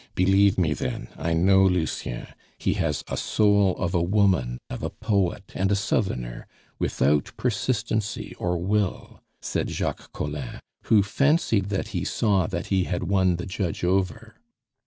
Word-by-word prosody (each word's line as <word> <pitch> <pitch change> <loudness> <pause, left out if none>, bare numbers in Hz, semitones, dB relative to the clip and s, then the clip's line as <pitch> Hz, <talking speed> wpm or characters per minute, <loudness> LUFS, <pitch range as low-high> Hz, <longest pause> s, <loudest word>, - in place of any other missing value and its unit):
"Believe 95 +1 +4
me, 80 -5 +2
then, - - -4
I 85 - -1
know 95 +3 +5
Lucien; 90 -9 0 0.3
he - - 0
has 75 -3 -1
a - - -3
soul 100 -3 +2
of 90 -1 -2
a 85 - +2
woman, 90 - +2
of 60 - -6
a - - -2
poet, 100 -1 -1
and 95 +1 0
a - - +4
southerner, 65 - -2 0.3
without 70 +1 +1
persistency 110 -2 -1
or 90 0 0
will," 100 +2 -2 0.2
said - - -1
Jacques - - -3
Collin, 75 -3 -5 0.3
who 105 -3 +5
fancied 115 - +2
that 100 -1 -2
he - - -2
saw 100 -6 +1
that - - -3
he 95 -2 +2
had 90 0 -2
won 95 -1 +2
the 90 - -5
judge 95 -4 -3
over. 95 +5 -1
95 Hz, 155 wpm, -25 LUFS, 85-100 Hz, 0.3 s, know